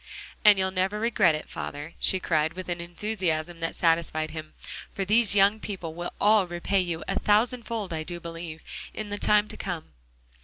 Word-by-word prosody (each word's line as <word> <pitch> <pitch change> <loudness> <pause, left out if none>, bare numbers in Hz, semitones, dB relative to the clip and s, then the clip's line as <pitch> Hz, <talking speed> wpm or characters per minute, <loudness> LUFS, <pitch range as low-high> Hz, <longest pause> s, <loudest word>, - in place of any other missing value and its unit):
"And 210 -2 +8
you'll 190 0 +1
never 190 +3 0
regret 215 -7 +3
it, 155 - -6
father," 145 +3 -6
she 190 - +3
cried, 160 -2 +1
with 185 +1 -7
an 175 -1 -2
enthusiasm 175 -2 -2
that 165 0 -3
satisfied 165 -2 +1
him, 155 -1 -8 0.4
"for 195 - -3
these 215 0 +4
young 200 +2 +5
people 185 -7 -5
will 175 +1 -5
all 210 -2 +4
repay 175 +3 0
you 170 -3 -2
a 195 - 0
thousand 230 +3 +2
fold, 215 -6 -3
I 160 - -2
do 175 +2 -5
believe, 165 -1 -7 0.3
in 215 -1 -5
the 205 0 -4
time 210 0 +3
to - - -7
come." 175 -4 -5
180 Hz, 190 wpm, -27 LUFS, 165-205 Hz, 0.4 s, And